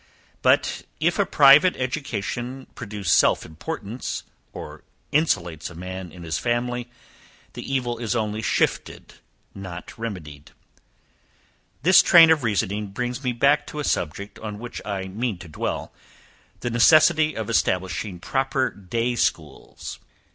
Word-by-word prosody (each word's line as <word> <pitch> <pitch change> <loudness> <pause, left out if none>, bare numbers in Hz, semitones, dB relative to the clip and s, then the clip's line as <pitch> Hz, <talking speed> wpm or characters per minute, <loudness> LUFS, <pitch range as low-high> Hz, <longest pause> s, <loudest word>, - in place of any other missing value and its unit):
But, - - +2 0.2
if 170 +5 +1
a 200 - +3
private 150 +2 +6
education 125 -1 -4
produce 105 -6 -4
self - - +4
importance, 110 - -5 0.3
or - - -9 0.3
insulates 90 - 0
a 85 - -12
man 90 0 -7
in 85 +1 -11
his 80 -1 -2
family, 120 0 -1 0.6
the - - -7
evil 120 -3 -1
is 120 0 -2
only 110 -1 -1
shifted, - - -1 0.4
not 90 -3 -8
remedied. 80 -10 -7 1.3
This 180 +3 +8
train 165 -2 +8
of 160 -2 +3
reasoning 105 -1 -1
brings 125 +6 -4
me 125 - 0
back 140 +5 +2
to 150 - -6
a - - -2
subject, 100 - -2
on 105 -2 -6
which 120 +2 -7
I 100 -2 -3
mean 110 +2 -3
to 90 - -11
dwell, 75 - -4 0.7
the 120 - -2
necessity 155 +6 +5
of 110 -2 -3
establishing 95 -2 -1
proper 130 +5 0
day 115 +5 -2
schools. 80 -9 -3
115 Hz, 135 wpm, -24 LUFS, 95-135 Hz, 1.3 s, This